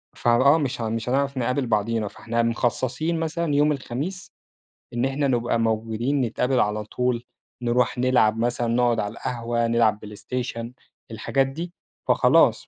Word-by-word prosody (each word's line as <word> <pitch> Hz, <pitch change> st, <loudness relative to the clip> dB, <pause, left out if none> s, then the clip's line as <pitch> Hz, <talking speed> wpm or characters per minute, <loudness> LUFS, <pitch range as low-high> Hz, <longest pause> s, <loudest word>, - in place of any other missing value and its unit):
فآه، 130 Hz, +6 st, +4 dB
مش 135 Hz, -6 st, -2 dB
ه 110 Hz, -, -1 dB
مش 115 Hz, +1 st, -3 dB
هنعرف 140 Hz, +1 st, 0 dB
نقابل 125 Hz, +2 st, 0 dB
بعضينا، 110 Hz, 0 st, 0 dB
فإحنا 115 Hz, +3 st, -2 dB
مخصصين 130 Hz, +7 st, -1 dB
مثلًا 165 Hz, -1 st, -1 dB
يوم 150 Hz, +1 st, +4 dB
الخميس 145 Hz, +7 st, -4 dB, 0.6 s
إن 120 Hz, +1 st, 0 dB
إحنا 135 Hz, +1 st, 0 dB
نبقى 120 Hz, -2 st, +1 dB
موجودين، 115 Hz, +4 st, 0 dB
نتقابل 125 Hz, +2 st, 0 dB
على 105 Hz, +1 st, 0 dB
طول، 125 Hz, +2 st, -1 dB, 0.4 s
نروح 120 Hz, +1 st, +1 dB
نلعب 125 Hz, -3 st, +3 dB
مثلًا، 120 Hz, +1 st, 0 dB
نقعد 120 Hz, 0 st, +2 dB
عالقهوة، 115 Hz, +2 st, -2 dB
نلعب 115 Hz, -2 st, +2 dB
بلايستيشن، 115 Hz, +3 st, -5 dB, 0.4 s
الحاجات 135 Hz, +5 st, 0 dB
دي. 165 Hz, +6 st, -6 dB, 0.3 s
فخلاص -, -, +4 dB
120 Hz, 135 wpm, -24 LUFS, 115-135 Hz, 0.6 s, فآه